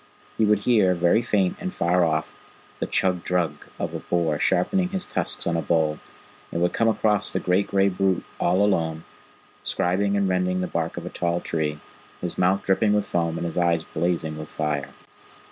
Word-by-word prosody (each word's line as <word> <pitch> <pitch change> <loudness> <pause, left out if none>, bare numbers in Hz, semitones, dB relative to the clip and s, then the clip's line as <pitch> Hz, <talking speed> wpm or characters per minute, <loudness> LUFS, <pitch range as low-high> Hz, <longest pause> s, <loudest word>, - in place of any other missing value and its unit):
He 110 - +2
would 105 -1 +2
hear, 105 -7 +4
very 85 +6 +3
faint 105 -6 +1
and 185 - -4
far 90 +1 +2
off, 80 -1 0 0.5
the - - -2
chug 90 -2 +1
drug 85 -5 -1
of - - -3
a - - -3
boar 80 -4 0
sharpening 180 - +2
his 190 -1 -2
tusks - - -1
on 85 - 0
a 85 - 0
bole; 80 -1 +1 0.5
and 85 - -2
would 90 0 +1
come 115 - +2
across 105 -2 +1
the - - -1
great 95 +2 +1
gray 100 0 +3
brute 95 -1 +1 0.2
all 95 +4 +3
alone, 80 -5 0 0.6
scribing 100 +3 +1
and 100 -1 +2
rending 90 0 0
the - - 0
bark 85 -1 -3
of 85 - -5
a - - -4
tall 85 0 -1
tree, 75 -3 -2 0.4
his - - -3
mouth 95 +2 +2
dripping 105 +2 +3
with 105 -1 +1
foam, 85 -3 -1
and - - -3
his 85 +1 -2
eyes 85 -2 +2
blazing 80 -2 -2
like 75 - -7
fire. 75 -3 -2
90 Hz, 195 wpm, -24 LUFS, 85-100 Hz, 0.6 s, hear